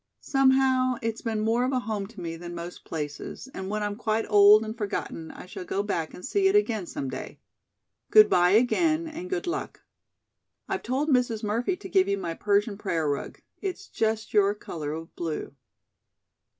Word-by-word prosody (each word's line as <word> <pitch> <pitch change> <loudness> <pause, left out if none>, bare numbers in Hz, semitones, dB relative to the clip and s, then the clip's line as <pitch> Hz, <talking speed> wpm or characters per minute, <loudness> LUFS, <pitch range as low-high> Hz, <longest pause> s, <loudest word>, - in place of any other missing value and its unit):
Somehow, 265 -1 +3
it's 225 0 -2
been 220 -2 -2
more 225 +3 +2
of 255 - 0
a 255 - +1
home 215 -5 -3
to 225 -1 -13
me 165 -2 -4
than 175 +1 -8
most 170 +1 -8
places, 150 - -5
and 190 0 -5
when 210 0 -1
I'm 205 0 -2
quite 220 0 -1
old 210 +1 +7
and 220 +1 -5
forgotten 200 -6 -4
I - - -10
shall 185 - -7
go 195 +2 -2
back 170 -6 -2
and 180 - -9
see 390 +6 +2
it 385 - +3
again 225 - +2
some 135 - -4
day. 130 0 -6 0.7
Good 430 -1 +8
bye 180 +1 +4
again, 310 +8 +3
and 330 +3 -7
good 370 -1 -2
luck. 355 +2 -4 0.9
I've 390 0 -2
told 270 +5 -1
Mrs. 245 -5 +2
Murphy 230 - 0
to 195 - -9
give 190 +1 +3
you 200 0 +1
my 175 -4 -3
Persian 205 +2 +1
prayer 165 -6 -1
rug. 145 -1 -3 0.2
It's 385 -3 -5
just 220 0 -1
your 205 -1 +4
color 155 -7 -5
of 165 +2 -7
blue. 160 -4 -4
215 Hz, 190 wpm, -27 LUFS, 180-255 Hz, 0.9 s, Good